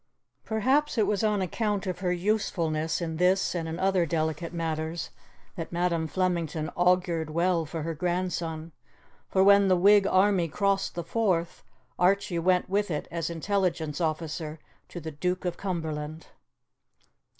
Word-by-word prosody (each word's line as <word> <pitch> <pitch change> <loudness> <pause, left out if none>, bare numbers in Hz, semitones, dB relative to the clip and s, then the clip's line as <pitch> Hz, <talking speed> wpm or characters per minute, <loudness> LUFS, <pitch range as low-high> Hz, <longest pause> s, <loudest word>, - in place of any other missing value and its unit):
Perhaps 260 +7 +1
it 215 - +4
was 205 +1 0
on 210 -3 +2
account 205 +3 -1
of 185 -2 -3
her 180 -1 0
usefulness 175 -5 0
in 160 -2 -3
this 185 +2 +2
and 165 -2 -3
in 160 - -4
other 190 -2 +2
delicate 160 +1 -2
matters 165 -1 -3 0.4
that 165 -3 -6
Madam 170 -2 0
Flemington 165 -2 -1
augured 175 -3 +2
well 170 0 +1
for 160 0 -4
her 165 +1 -2
grandson, 170 -1 -2 0.6
for 190 - +3
when 200 0 +6
the 185 -1 +4
Whig 200 +2 +5
army 190 -2 +3
crossed 195 +4 0
the 170 - -3
Forth, 175 -4 0 0.4
Archie 180 -1 +2
went 180 +1 +2
with 200 +1 0
it 150 -3 -3
as 165 -1 -2
intelligence 170 -3 -1
officer 155 -1 -2 0.3
to 175 - -7
the 160 -1 -6
Duke 180 +5 -2
of 175 - -1
Cumberland. 160 -4 -4
175 Hz, 150 wpm, -27 LUFS, 160-190 Hz, 0.6 s, when